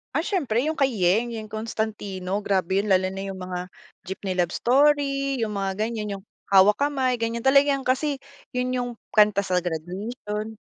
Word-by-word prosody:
Ah, - - +3
siyempre 275 - 0
yung 315 - 0
kay 270 -3 +2
Yeng, 215 +4 +2
Yeng 220 -1 -6
Constantino. 210 -3 -3
Grabe 190 0 +1
yun 210 - -2
lalo 185 0 +4
na 195 +1 -5
yung 190 - -8
mga 180 0 -5 0.3
Jeepney 190 0 -4
Love 175 -1 +1
Story, 275 0 +2
yung 215 -2 -2
mga 195 +2 -1
ganyan, 210 -4 -4
yung - - -20 0.3
Hawak 200 +7 +6
Kamay 265 -3 +1
ganyan, 230 0 -2
talagang 275 +1 +3
kasi 275 +2 +1 0.3
yun 250 0 -1
yung 245 -1 -1 0.3
kanta 210 -1 +5
sa 185 -2 -1
graduation. 210 +6 -4
215 Hz, 170 wpm, -25 LUFS, 190-255 Hz, 0.3 s, Hawak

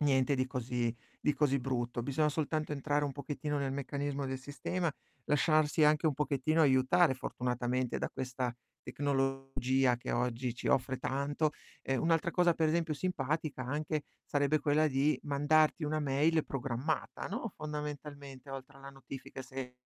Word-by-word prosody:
niente 135 -2 +3
di 130 0 +1
così 125 -2 -1 0.3
di 150 - +2
così 140 -2 +2
brutto, 120 -2 -2
bisogna 140 +4 +1
soltanto 155 0 -1
entrare 145 +1 0
un 145 - -1
pochettino 145 +1 -3
nel 135 -1 -1
meccanismo 140 +1 -2
del 130 0 -3
sistema, 155 +6 -2 0.4
lasciarsi 155 +1 +3
anche 150 +2 +5
un 155 - +3
pochettino 150 +3 +2
aiutare, 130 +3 +5
fortunatamente, 125 0 -1
da - - -1
questa 125 -1 -3 0.3
tecnologia 135 -2 +1
che 120 - -4
oggi 120 0 -1
ci 120 - -3
offre 130 0 +2
tanto. 145 +3 0 0.3
E 135 - 0
un'altra 165 +3 +2
cosa 175 -1 +3
per 160 -1 +2
esempio 165 -1 +1
simpatica, 150 -4 -2
anche, 150 +3 -1 0.2
sarebbe 145 +1 +2
quella 150 +2 +3
di 140 +1 +2
mandarti 150 +3 +3
una 155 +1 0
mail 150 +3 +2
programmata, 135 +3 -2
no, 225 0 -4
fondamentalmente 145 -2 -6
oltre 135 +1 -8
alla 135 0 -9
notifica, 135 -1 -9
se 130 -1 -7
140 Hz, 150 wpm, -33 LUFS, 130-150 Hz, 0.4 s, anche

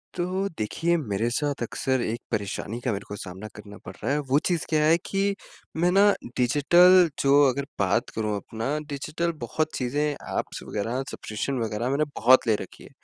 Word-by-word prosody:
तो 185 +2 -1
देखिए 165 +11 0
मेरे 110 -5 -1
साथ 145 +2 -2
अक्सर 130 +2 -1
एक 115 0 -2
परेशानी 105 +2 -3
का 125 - -1
मेरे 100 -1 -3
को 105 - -6
सामना 95 +2 -8
करना 105 -1 -11
पड़ - - -7
रहा - - 0
है, 145 - +1
वो 140 0 +1
चीज़ 175 -3 0
क्या 155 -1 +2
है 160 +2 +5
कि 200 0 0 0.4
मैं 175 +2 +3
ना 200 +2 +6 0.3
डिजिटल 175 +8 +5
जो 140 +1 +5
अगर 140 +2 -2
बात 100 +4 +1
करूँ 105 -1 -1
अपना 115 +7 -3
डिजिटल 155 +4 -2
बहुत 155 +6 -2
चीज़ें 130 +3 -1
ऐप्स 145 - -5
वग़ैरह 115 +4 -2
सब्सक्रिप्शन 125 +5 -4
वग़ैरह 110 +2 -2
मैंने 140 +3 +1
बहुत 130 +2 +5
ले 110 - +4
रखी - - -11
है - - -13
135 Hz, 185 wpm, -25 LUFS, 110-160 Hz, 0.4 s, ना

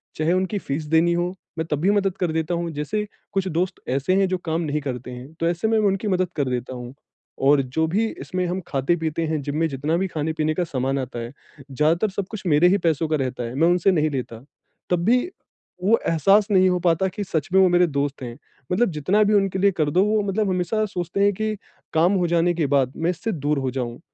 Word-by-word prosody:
चाहे 155 +3 +1
उनकी 185 +3 0
फीस 150 0 -4
देनी 160 +3 +3
हो 175 +1 0 0.3
मैं 160 - -1
तब 150 - 0
भी 195 +3 +3
मदद 195 -2 0
कर 175 -3 0
देता 160 +2 -1
हूँ, 170 0 -2
जैसे 160 +9 -2 0.3
कुछ 195 -1 0
दोस्त 180 +2 -1
ऐसे 140 +8 +1
है 190 - +3
जो 185 0 -1
काम 160 +1 -1
नहीं 150 -2 -2
करते 125 -2 -5
हैं 125 +4 -10
तो 165 - +1
ऐसे 175 +5 -1
में 220 0 +2
उनकी 200 0 +1
मदद 185 -2 +1
कर 140 -4 0
देता 125 +1 -3
हूँ। 125 0 -8 0.5
और 140 +1 +5
जो 160 +6 -1
भी 210 +7 +1 0.2
इसमें 185 0 -2
हम 180 +2 -2
खाते-पीते 160 +3 -1
हैं 155 -2 -1
जिम 145 +2 -3
में 165 +1 +2
जितना 145 +5 -1
भी 190 - 0
खाने-पीने 155 -1 -1
का 180 - -1
सामान 135 -3 -1
आता 125 -2 -5
है, 115 +1 -6 0.4
ज़्यादातर 160 +9 +2
सब 195 0 -4
कुछ 215 -3 -6
मेरे 155 +3 +5
ही 200 - +3
पैसों 165 -2 0
का 155 - +1
रहता 130 -2 -3
है 120 +2 -5
मैं 160 +4 +3
उनसे 180 +2 +3
नहीं 155 -3 +2
लेता, 125 -4 -5 0.5
तब 175 -1 +1
भी 245 +3 +5 0.6
वो 225 +4 +4
एहसास 195 +6 +4
नहीं 185 -1 +5
हो 180 - +1
पाता 175 +1 +2
कि 205 +3 -4
सच 160 -6 -2
में 190 - +6
वो 190 - +6
मेरे 175 0 +4
दोस्त 140 -2 -2
हैं। 120 -1 -7 0.3
मतलब 205 +4 +2
जितना 180 +8 +2
भी 210 +1 +2
उनके 195 -2 +2
लिए 200 +1 +4
कर 155 -5 0
दो 185 +4 +4
वो 215 0 +2
मतलब 200 +1 0
हमेशा 185 +4 0
सोचते 180 0 -2
हैं 205 0 +4
कि 215 +2 -2 0.4
काम 170 +5 +3
हो 180 -2 +1
जाने 170 +1 +2
के 165 -2 0
बाद 135 -2 +2
मैं 165 +1 0
इससे 225 +5 -4
दूर 150 -4 -1
हो 130 -1 -2
जाऊँ, 120 -2 -4
170 Hz, 240 wpm, -23 LUFS, 145-190 Hz, 0.6 s, में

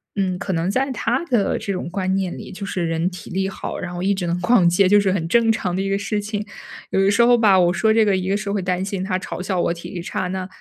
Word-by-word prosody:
嗯， 185 -2 0
可 190 - -3
能 165 +3 0
在 265 +4 0
他 245 +4 -1
的 240 -9 +1
这 200 - -3
种 175 -2 -4
观 185 0 -1
念 190 -2 -2
里， - - -9
就 195 +1 -6
是 180 -3 -2
人 165 +2 0
体 180 - -10
力 190 +1 -1
好， - - -6
然 180 -1 -5
后 175 +1 -4
一 200 +1 +2
直 180 -3 -3
能 175 +1 -1
逛 195 -4 +4
街 185 +2 +3
就 205 +1 +6
是 195 -2 +1
很 165 -4 -1
正 230 +3 +3
常 185 -5 -2
的 190 - -1
一 195 - -2
个 195 - +1
事 205 +1 -2
情。 210 0 -4 0.5
有 190 - +2
的 195 - +4
时 235 +3 +3
候 240 0 +5
吧， 200 -5 +5
我 175 0 +3
说 220 +2 +2
这 220 -1 +4
个， 200 -2 +2
一 185 +1 -3
个 200 - +2
是 200 -1 -4
会 200 -2 -1
担 180 0 -1
心 195 -2 -3
他 185 -1 -1
嘲 185 - -6
笑 185 -1 -1
我 170 - +1
体 170 - -9
力 175 - -6
差， 180 +1 -3
那 185 0 -4
190 Hz, 325 characters per minute, -21 LUFS, 180-205 Hz, 0.5 s, 就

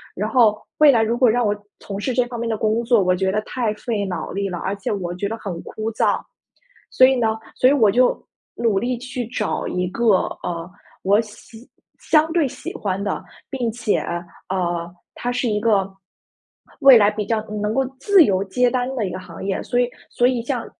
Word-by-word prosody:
然 210 +3 -2
后 220 -5 +3 0.2
未 300 -1 +8
来 235 -4 +3
如 225 +2 0
果 250 -1 +5
让 240 +2 +2
我 205 0 +1 0.2
从 200 0 -6
事 255 +4 -2
这 250 0 +2
方 240 -1 -7
面 235 0 -2
的 220 - -1
工 220 +2 0
作， 230 -2 +3
我 180 0 +2
觉 190 +1 0
得 210 - 0
太 235 -4 -2
费 210 -2 -2
脑 185 -2 -4
力 195 +1 -2
了， 175 - -4
而 195 - -2
且 200 - -4
我 180 -4 -3
觉 200 +2 -2
得 225 - -4
很 180 -6 -6
枯 220 +1 -5
燥。 - - +1 0.7
所 255 - +6
以 265 - +3
呢， 235 -3 +1 0.3
所 255 - +4
以 - - +4
我 225 -8 +4
就 250 +4 +3 0.4
努 225 -4 +1
力 245 +4 -1
去 250 -1 -5
找 215 -4 -2
一 180 0 -1
个， 235 +6 -3 0.4
呃， 170 0 -4 0.3
我 200 +2 +3
喜 225 +2 -14 0.3
相 315 0 +2
对 330 -4 +2
喜 - - -7
欢 195 -1 -2
的， 205 - -2 0.3
并 250 -4 -2
且， 225 -2 0 0.5
呃， 175 -2 -2 0.2
它 245 - -4
是 245 -1 -1
一 210 0 0
个， 205 -3 +1 0.9
未 275 -3 +9
来 205 -1 +4
比 210 0 -3
较 225 0 0 0.2
能 210 +1 -1
够 270 +3 +1
自 395 +2 +6
由 190 -8 +1
接 250 +6 +2
单 250 -1 0
的 230 -5 -1
一 - - -5
个 - - -5
行 185 - -10
业， 195 -1 -2
所 245 - -2
以 245 -1 +2 0.2
所 245 - +1
以 250 -2 0
像 245 -2 -3
220 Hz, 230 characters per minute, -21 LUFS, 200-245 Hz, 0.9 s, 未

